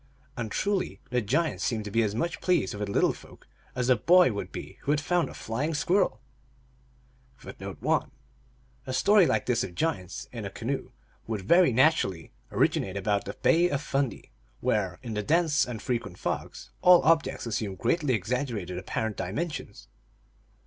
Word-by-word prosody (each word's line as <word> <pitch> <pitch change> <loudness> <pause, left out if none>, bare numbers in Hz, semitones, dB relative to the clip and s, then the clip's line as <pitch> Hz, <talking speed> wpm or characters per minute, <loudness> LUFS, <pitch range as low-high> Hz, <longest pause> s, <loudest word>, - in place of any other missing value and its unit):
And 115 -3 -4
truly 200 - -1
the 125 0 +1
giants 160 +10 0
seemed 110 -4 -1
to 105 - -6
be 115 +2 +2
as 105 -2 0
much 165 +9 -2
pleased 175 - +1
wjth 105 0 -4
the - - -4
little - - +3
folk - - -16 0.3
as 125 -1 -1
a 130 - +5
boy 175 +6 +5
would 100 - -5
be - - -8
who - - -6
had 145 0 +3
found 175 +3 0
a - - -10
flying 145 +9 -2
squirrel. 180 +6 +1 1.2
1 - - -8
1 - - 0 0.8
A 130 - -3
story 195 +8 +5
like - - +1
this 125 -2 +1
of 90 - -7
giants 125 - -2
in 115 -3 -6
a 100 - -4
canoe 120 +7 -4 0.4
would 110 -4 -3
very 170 - +5
naturally 125 - +2 0.2
originate 95 0 +1
about 100 +1 0
the - - -5
Bay 170 +2 +4
of 140 - 0
Fundy, 135 -5 -2 0.3
where, 95 -5 0
in 115 -3 -5
the 105 - -1
dense 155 +3 +2
and 120 -3 -6
fre 130 - 0
quent 90 -6 -10
fogs, - - -4
all 180 -1 +7
objects 160 -6 +2
assume 105 -4 -2
greatly 140 - +1
exaggerated 105 -4 -3
apparent 110 +2 -3
di 90 - -3
mensions. 155 - -5
125 Hz, 175 wpm, -28 LUFS, 105-160 Hz, 1.2 s, all